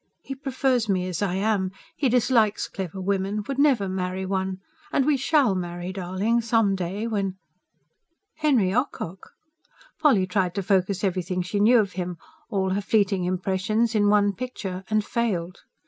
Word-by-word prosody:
He 270 Hz, -, -5 dB
prefers 260 Hz, -4 st, 0 dB
me 185 Hz, -2 st, +1 dB
as 180 Hz, 0 st, -3 dB
I 190 Hz, -3 st, 0 dB
am. 195 Hz, -1 st, +1 dB, 0.3 s
He 275 Hz, -, +1 dB
dislikes 235 Hz, -3 st, +2 dB
clever 190 Hz, -1 st, -6 dB
women... 195 Hz, +2 st, -1 dB
would 275 Hz, 0 st, -3 dB
never 265 Hz, -9 st, +3 dB
marry 185 Hz, 0 st, -3 dB
one. 190 Hz, 0 st, -2 dB, 0.3 s
And 270 Hz, -, +2 dB
we 300 Hz, 0 st, +3 dB
SHALL 270 Hz, -4 st, +3 dB
marry, 175 Hz, 0 st, -4 dB
darling, 195 Hz, +5 st, 0 dB
some 225 Hz, -3 st, +2 dB
day 190 Hz, +3 st, -3 dB
when 200 Hz, -4 st, -1 dB, 0.5 s
..." 335 Hz, -, -52 dB
Henry 250 Hz, -12 st, +3 dB
Ocock! 195 Hz, -, -3 dB, 0.7 s
Polly 265 Hz, -12 st, +4 dB
tried 185 Hz, -1 st, 0 dB
to 200 Hz, -, -1 dB
focus 190 Hz, 0 st, +1 dB
everything 185 Hz, -1 st, -1 dB
she 190 Hz, +3 st, -2 dB
knew 230 Hz, +4 st, +6 dB
of 205 Hz, -4 st, +2 dB
him, 180 Hz, -2 st, -4 dB, 0.3 s
all 190 Hz, -4 st, 0 dB
her 200 Hz, +2 st, 0 dB
fleeting 200 Hz, -3 st, +1 dB
impressions, 190 Hz, +5 st, 0 dB
in 205 Hz, -2 st, +3 dB
one 205 Hz, -1 st, +3 dB
picture 195 Hz, -5 st, -5 dB
and 215 Hz, -1 st, +1 dB
failed. 185 Hz, -7 st, -2 dB
200 Hz, 160 wpm, -25 LUFS, 185-230 Hz, 0.7 s, knew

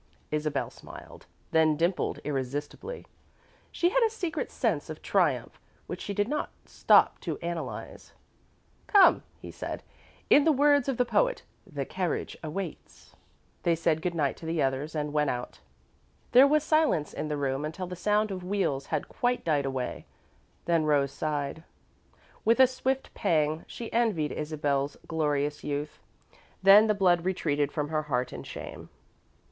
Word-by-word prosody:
Isabel 150 Hz, -2 st, -1 dB
smiled, -, -, -13 dB, 0.2 s
then 160 Hz, -2 st, +3 dB
dimpled 170 Hz, +3 st, 0 dB
irresistibly. 145 Hz, -, -4 dB, 0.7 s
She 350 Hz, -, +2 dB
had -, -, +2 dB
a 455 Hz, -, +4 dB
secret 370 Hz, -7 st, -3 dB
sense -, -, -1 dB
of -, -, -8 dB
triumph -, -, 0 dB, 0.2 s
which -, -, -6 dB
she 200 Hz, -, -4 dB
did 205 Hz, +1 st, +1 dB
not 300 Hz, +4 st, -2 dB, 0.2 s
stop -, -, +4 dB
to -, -, -4 dB
analyse. 170 Hz, -1 st, -6 dB, 0.8 s
"Come," 400 Hz, -3 st, +6 dB, 0.2 s
he -, -, -9 dB
said. -, -, -6 dB, 0.4 s
"In 285 Hz, -, +6 dB
the 320 Hz, -, +4 dB
words 285 Hz, -1 st, +3 dB
of 265 Hz, -, -1 dB
the 250 Hz, -, +3 dB
poet, -, -, +1 dB, 0.3 s
'the 140 Hz, -3 st, -3 dB
carriage 180 Hz, +1 st, -3 dB
waits.'" 165 Hz, +2 st, -7 dB, 0.5 s
They 170 Hz, -1 st, +2 dB
said 160 Hz, -1 st, +1 dB
good 175 Hz, 0 st, -2 dB
night 145 Hz, -4 st, 0 dB
to 160 Hz, -, -9 dB
the 165 Hz, 0 st, -1 dB
others, 135 Hz, +3 st, -1 dB
and 150 Hz, -1 st, -2 dB
went 150 Hz, -1 st, +2 dB
out. 125 Hz, 0 st, -4 dB, 0.7 s
There 260 Hz, +3 st, +8 dB
was 300 Hz, +1 st, +3 dB
silence 310 Hz, -, +2 dB
in -, -, -4 dB
the 150 Hz, -1 st, -2 dB
room 135 Hz, 0 st, -1 dB
until 160 Hz, +5 st, -4 dB
the 180 Hz, 0 st, -6 dB
sound 210 Hz, +3 st, +1 dB
of 185 Hz, -2 st, -5 dB
wheels 180 Hz, -8 st, -1 dB
had -, -, -2 dB
quite 245 Hz, 0 st, -1 dB
died 145 Hz, -4 st, +1 dB
away, 130 Hz, -2 st, -4 dB, 0.6 s
then 170 Hz, -2 st, +2 dB
Rose 140 Hz, -2 st, +2 dB
sighed. 145 Hz, +1 st, -3 dB, 0.8 s
With 230 Hz, +3 st, +3 dB
a 260 Hz, -, +9 dB
swift 260 Hz, +1 st, -2 dB
pang, 155 Hz, -5 st, 0 dB
she 235 Hz, -, -8 dB
envied 215 Hz, -10 st, +1 dB
Isabel's 145 Hz, -2 st, -2 dB
glorious 150 Hz, -2 st, -1 dB
youth, 145 Hz, +1 st, -4 dB, 0.6 s
then 200 Hz, +3 st, +8 dB
the 215 Hz, -, +2 dB
blood 180 Hz, -3 st, +3 dB
retreated 150 Hz, -6 st, 0 dB
from 150 Hz, -1 st, -2 dB
her 155 Hz, -1 st, 0 dB
heart 125 Hz, -4 st, -2 dB
in -, -, -6 dB
shame. -, -, -9 dB
160 Hz, 155 wpm, -28 LUFS, 150-215 Hz, 0.8 s, a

